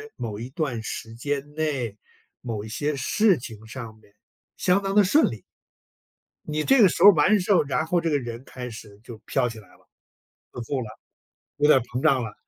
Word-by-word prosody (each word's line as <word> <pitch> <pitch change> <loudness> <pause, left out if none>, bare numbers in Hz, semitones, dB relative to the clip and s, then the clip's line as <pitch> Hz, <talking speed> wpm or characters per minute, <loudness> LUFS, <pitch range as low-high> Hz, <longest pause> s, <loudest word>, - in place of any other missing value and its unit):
某 105 -3 -5
一 120 - -6
段 135 -6 -3
时 115 0 -6
间 145 +3 -4
内、 135 -9 -2 0.4
某 110 -4 -4
一 - - -8
些 145 +6 -2
事 195 - +3
情 110 -3 -10
上 115 -2 -9
面 105 -2 -25 0.4
相 185 +2 +2
当 195 0 -3
地 210 - +7
顺 290 +12 +4
利。 110 -5 -9 1.1
你 155 0 -1
这 270 - +4
个 205 - +8
时 170 - -1
候 200 - +11
完 185 +5 +3
时 185 +2 -1
候， 185 - +5
然 145 +2 -1
后 175 +1 +2
这 165 - -1
个 145 -2 +1
人 120 -1 -7
开 125 -2 -7
始 105 -2 -12
就 120 -2 -10
飘 125 - 0
起 115 - -9
来 105 - -17
了， - - -24 0.6
不 125 - -7
做 130 +3 -3
了， 115 - -6 0.7
有 145 0 +3
点 150 - +7
儿 - - +1
膨 125 +2 -5
胀 135 -5 +3
了。 110 -2 -6
130 Hz, 225 characters per minute, -24 LUFS, 115-155 Hz, 1.1 s, 候